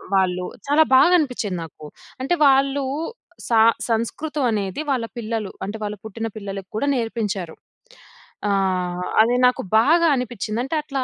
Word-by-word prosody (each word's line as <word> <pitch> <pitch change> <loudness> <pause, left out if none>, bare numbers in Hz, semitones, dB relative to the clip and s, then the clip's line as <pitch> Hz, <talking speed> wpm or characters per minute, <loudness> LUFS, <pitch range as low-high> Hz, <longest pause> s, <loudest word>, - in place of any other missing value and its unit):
వాళ్ళు 180 -1 +1 0.2
చాలా 305 +2 +5
బాగ 265 +6 +7
అనిపిచ్చేది 240 - -2
నాకు. 155 -1 -12 0.4
అంటే 275 - 0
వాళ్ళు 275 0 +3 0.6
సా 230 -2 +4 0.3
సంస్కృతం 280 +6 -2
అనేది 200 +3 -2
వాళ్ళ 245 -4 0
పిల్లలు, 220 -3 -3
అంటే 205 +3 -5
వాళ్ళు 210 0 -4
పుట్టిన 225 +1 -4
పిల్లలకి 195 -2 -7
కూడా 280 +7 -1
నేర్పించారు. 210 -7 -3 0.9
ఆహ్, 185 -2 0 0.2
అది 235 +3 +3
నాకు 250 - 0 0.2
బాగా 330 +8 +4
అనిపిచ్చింది. 230 -2 -3
అంటే 275 - -3
అట్లా 275 -3 -3
225 Hz, 135 wpm, -22 LUFS, 195-265 Hz, 0.9 s, బాగ